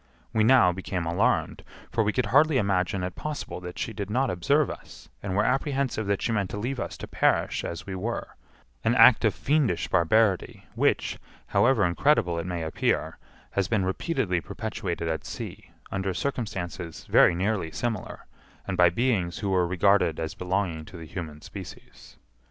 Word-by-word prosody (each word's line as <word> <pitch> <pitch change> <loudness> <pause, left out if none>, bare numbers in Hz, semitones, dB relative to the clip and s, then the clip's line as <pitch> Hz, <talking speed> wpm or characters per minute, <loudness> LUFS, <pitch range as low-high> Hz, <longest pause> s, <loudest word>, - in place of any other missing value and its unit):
We 110 - +3
now 115 -5 +6
became 90 -1 -4
alarmed, 105 +10 +1 0.3
for 115 -2 +2
we 105 - +1
could 125 +1 0
hardly 150 0 +5
imagine 95 -3 0
it 90 0 -3
possible 150 -9 -5
that 90 0 -8
she 115 - -3
did 100 -1 -5
not 130 +4 +1
observe 140 - +2
us, - - -12
and 95 -2 -3
were 100 - +3
apprehensive 135 -5 0
that 100 -1 0
she - - 0
meant 100 -4 0
to - - -5
leave 125 +5 -3
us - - -4
to - - -7
perish - - +1
as 85 - -5
we 95 - -6
were—an 95 - -4
act 115 -1 +7
of 110 - +2
fiendish 140 - +1
barbarity, 95 +3 +2
which, - - +1 0.3
however 120 -5 +3
incredible 90 - +2
it 85 - -4
may 85 -2 -3
appear, 80 - -1 0.3
has 100 -2 0
been 105 -5 +1
repeatedly 95 - -1
perpetuated 95 -7 -4
at 80 -3 -2
sea, - - -7 0.2
under 95 -1 -2
circumstances 95 - -4
very - - +5
nearly 95 -2 -1
similar, 115 +4 -4 0.4
and 95 - -3
by 90 -1 +6
beings 95 -4 0
who 100 - -2
were 90 -2 +2
regarded 90 -2 +3
as 80 -1 -3
belonging 90 -3 -2
to 90 - -11
the 80 - -8
human 80 -2 -7
species. - - -11
100 Hz, 170 wpm, -26 LUFS, 90-115 Hz, 0.4 s, act